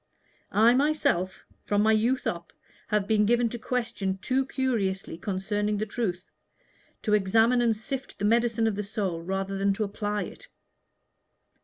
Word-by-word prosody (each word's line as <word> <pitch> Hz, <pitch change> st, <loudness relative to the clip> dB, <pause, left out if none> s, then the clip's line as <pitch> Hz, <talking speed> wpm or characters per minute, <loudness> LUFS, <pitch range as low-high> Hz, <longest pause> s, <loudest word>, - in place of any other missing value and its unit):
I 225 Hz, +3 st, +6 dB
myself, 255 Hz, -, +1 dB, 0.2 s
from 205 Hz, 0 st, +1 dB
my 220 Hz, -, +4 dB
youth 235 Hz, +4 st, +2 dB
up, 170 Hz, -1 st, -3 dB, 0.4 s
have 210 Hz, -2 st, 0 dB
been 215 Hz, -1 st, +3 dB
given 240 Hz, 0 st, +3 dB
to 240 Hz, -, -6 dB
question 225 Hz, -6 st, -2 dB
too 260 Hz, +6 st, 0 dB
curiously 215 Hz, -11 st, -1 dB
concerning 205 Hz, +3 st, -2 dB
the 215 Hz, -, -1 dB
truth 200 Hz, -4 st, -3 dB, 0.8 s
to 210 Hz, -, +1 dB
examine 225 Hz, +5 st, +4 dB
and 230 Hz, -2 st, +2 dB
sift 270 Hz, +4 st, -6 dB
the 205 Hz, -, -2 dB
medicine 230 Hz, 0 st, +2 dB
of 220 Hz, -, +2 dB
the 210 Hz, -, -2 dB
soul 195 Hz, -5 st, -3 dB
rather 195 Hz, +2 st, -3 dB
than 200 Hz, 0 st, +2 dB
to 215 Hz, -, -1 dB
apply 205 Hz, 0 st, -2 dB
it." -, -, -10 dB
210 Hz, 155 wpm, -27 LUFS, 195-235 Hz, 0.8 s, I